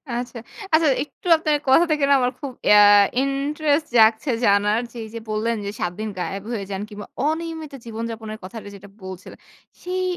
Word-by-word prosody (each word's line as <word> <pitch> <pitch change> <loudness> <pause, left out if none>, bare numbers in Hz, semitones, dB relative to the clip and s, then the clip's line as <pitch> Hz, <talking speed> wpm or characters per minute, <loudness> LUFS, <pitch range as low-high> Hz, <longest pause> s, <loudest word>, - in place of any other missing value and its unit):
আচ্ছা। 245 0 -5 0.4
আচ্ছা, 315 0 +5 0.2
একটু 325 - -13
আপনার 305 -2 +1
কথা 265 +6 +6
থেকে 300 -2 +1
না, - - +6
আমার 250 0 +1
খুব 280 -3 -5 0.2
ইয়া 210 0 +8 0.4
ইন্টারেস্ট 290 +2 0
জাগছে 220 +4 +4
জানার। 205 +3 +3
যে 240 - -12
এইযে 230 +1 -8
বললেন 220 +2 0
যে, - - -2
৭ 175 -5 -1
দিন 215 0 -3
গায়েব 195 +2 -4
হয়ে 205 - -3
যান 195 +1 -3
কিংবা 205 -1 -8 0.2
অনিয়মিত 320 -1 -4
জীবনযাপনের 225 -1 -6
কথাটা 220 +3 -9
যেটা 200 +1 -13
বলছিলেন, 185 -1 -9 0.4
সেই 370 +1 -2
230 Hz, 170 wpm, -22 LUFS, 215-295 Hz, 0.4 s, ইয়া